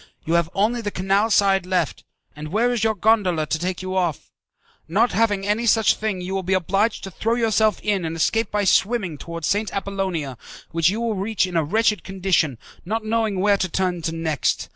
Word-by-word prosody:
You 165 - -1
have 170 -1 +2
only 225 +4 +1
the 210 - -2
canal 195 +3 +1
side 195 -3 +3
left, 180 -5 -1 0.3
and 150 +1 -7
where 225 +9 +1
is 230 -3 -1
your 220 -1 +2
gondola 195 -6 +2
to 160 - -2
take 185 +1 -3
you 185 0 -4
off? 175 -6 -1 0.6
Not 220 +9 +2
having 205 -3 +1
any 215 +3 0
such 225 -1 +4
thing, 215 -4 -3
you 185 +2 -5
will 195 - -1
be 190 +1 0
obliged 195 +5 0
to 195 - -6
throw 225 +5 -1
yourself 220 -3 +2
in 205 -3 0
and 165 0 -3
escape 225 +6 +1
by 210 0 0
swimming 190 -5 +1
towards 170 -1 -6
St. 205 +6 0
Appollonia, 190 -9 -3 0.3
which 165 0 +3
you 210 +4 -2
will 230 -1 0
reach 200 +1 0
in 180 -1 -6
a 165 - +3
wretched 210 +6 +1
condition, 185 -8 0 0.3
not 220 +4 -3
knowing 220 -3 0
where 200 +1 +3
to 185 - -1
turn 180 -1 -1
to 165 - -2
next. 160 -3 -1
195 Hz, 205 wpm, -22 LUFS, 175-215 Hz, 0.6 s, such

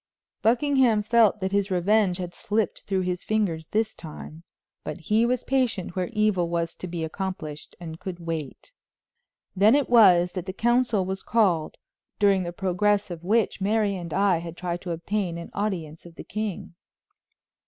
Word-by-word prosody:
Buckingham 245 -2 +3
felt 220 -2 +3
that 190 0 -1
his 200 0 +1
revenge 190 +1 +2
had 180 -2 -5
slipped 210 0 -1
through 190 -1 0
his 180 -1 -2
fingers 185 -8 -1
this 220 0 0
time, 160 0 -10 0.4
but 150 - -5
he 220 +7 +2
was 250 0 0
patient 245 -10 -1
where 185 -1 -1
evil 210 -6 +1
was 170 -1 -2
to 185 - -6
be 170 -1 -4
accomplished, 160 -3 -5
and 165 -2 -8
could 180 -2 -6
wait. 165 - -6 0.8
Then 210 +6 +5
it 285 -2 +2
was 180 -7 +6
that 185 -1 -6
the 190 - -4
council 240 -2 +2
was 190 +1 -4
called 185 -9 +1 0.4
during 200 -2 +3
the 175 -1 -4
progress 195 +2 0
of 170 -1 -7
which 215 +1 +1
Mary 205 0 +1
and 170 -3 -6
I 195 -2 +2
had 170 0 -8
tried 175 -1 -3
to 180 - -5
obtain 175 +1 -2
an 170 - -8
audience 175 -6 -4
of 170 - -15
the - - -8
king. 215 -5 -5
190 Hz, 170 wpm, -25 LUFS, 175-215 Hz, 0.8 s, was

